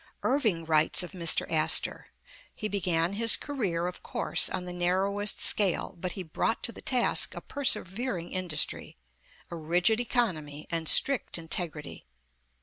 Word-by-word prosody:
Irving 220 Hz, -, 0 dB
writes 160 Hz, +2 st, +2 dB
of 180 Hz, -, -9 dB
Mr. 170 Hz, -4 st, +2 dB
Astor: 155 Hz, -1 st, +2 dB, 0.5 s
^'He 215 Hz, -, -4 dB
began 180 Hz, -3 st, -1 dB
his 230 Hz, +2 st, +5 dB
career, 200 Hz, -, -3 dB
of 180 Hz, 0 st, -6 dB
course, -, -, -1 dB
on 180 Hz, -, -5 dB
the 180 Hz, -, -7 dB
narrowest 195 Hz, +3 st, 0 dB
scale; 195 Hz, -4 st, +3 dB
but 180 Hz, +1 st, -5 dB
he 190 Hz, -, -6 dB
brought 170 Hz, +7 st, -3 dB
to 235 Hz, -, 0 dB
the -, -, -13 dB
task 250 Hz, -2 st, +2 dB
a -, -, -6 dB
persevering 210 Hz, -7 st, -2 dB
industry, 180 Hz, -5 st, -1 dB, 0.5 s
a -, -, -5 dB
rigid 175 Hz, +7 st, 0 dB
economy, 165 Hz, -, -3 dB
and 165 Hz, -1 st, 0 dB
strict 275 Hz, -9 st, +3 dB
integrity. 160 Hz, -, -5 dB
180 Hz, 145 wpm, -27 LUFS, 165-215 Hz, 0.5 s, his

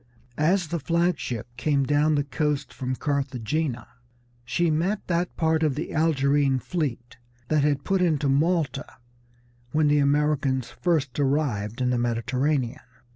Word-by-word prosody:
As 175 Hz, +2 st, +2 dB
the 170 Hz, -, -2 dB
flag 170 Hz, +4 st, +1 dB
ship 115 Hz, -3 st, -4 dB
came 140 Hz, +1 st, +1 dB
down 150 Hz, +2 st, +2 dB
the 145 Hz, -, +1 dB
coast 145 Hz, 0 st, -2 dB
from 130 Hz, 0 st, -3 dB
Carthagena 135 Hz, -2 st, -2 dB, 0.6 s
she 165 Hz, +7 st, 0 dB
met 180 Hz, +7 st, 0 dB
that 175 Hz, 0 st, -1 dB
part 160 Hz, -1 st, +2 dB
of 150 Hz, -4 st, +1 dB
the 155 Hz, -, -4 dB
Algerine 145 Hz, -3 st, +2 dB
fleet 125 Hz, -5 st, -4 dB, 0.3 s
that 155 Hz, -1 st, +3 dB
had 145 Hz, -1 st, +1 dB
put 195 Hz, -1 st, +1 dB
into 155 Hz, -5 st, +2 dB
Malta 150 Hz, +1 st, 0 dB, 0.8 s
when 150 Hz, -1 st, +3 dB
the 145 Hz, 0 st, +4 dB
Americans 140 Hz, -3 st, +1 dB
first 150 Hz, -7 st, -1 dB
arrived 130 Hz, -6 st, 0 dB
in 125 Hz, 0 st, +1 dB
the 125 Hz, -, +1 dB
Mediterranean. 125 Hz, +3 st, 0 dB
145 Hz, 140 wpm, -25 LUFS, 130-160 Hz, 0.8 s, the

